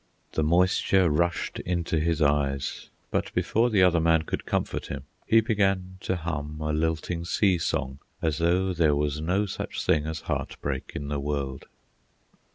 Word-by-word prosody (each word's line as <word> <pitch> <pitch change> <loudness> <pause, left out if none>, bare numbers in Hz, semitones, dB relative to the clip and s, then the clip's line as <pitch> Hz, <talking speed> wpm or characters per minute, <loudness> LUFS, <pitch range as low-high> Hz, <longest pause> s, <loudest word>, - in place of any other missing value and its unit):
The - - 0
moisture 90 +2 +3
rushed 85 +3 0
into 85 -2 -1
his 80 0 +1
eyes, 70 -2 0 0.2
but, - - -1
before 115 +2 +2
the 100 -5 +4
other 90 -2 +4
man 80 -1 +3
could - - -4
comfort - - -1
him, - - -5 0.2
he 115 0 +6
began 95 -4 0
to 95 - -1
hum 80 -3 -4
a 75 0 -1
lilting 80 +2 -1
sea 90 +1 +2
song 65 -4 -2 0.2
as 80 -1 -1
though 90 +3 +2
there 80 -4 +3
was 75 0 -1
no 95 +6 +1
such 100 - -5
thing 75 -1 +2
as 80 -1 -4
heartbreak 70 -2 -4
in 70 0 -4
the 75 -1 -1
world. 70 -2 -3
80 Hz, 165 wpm, -27 LUFS, 75-90 Hz, 0.2 s, he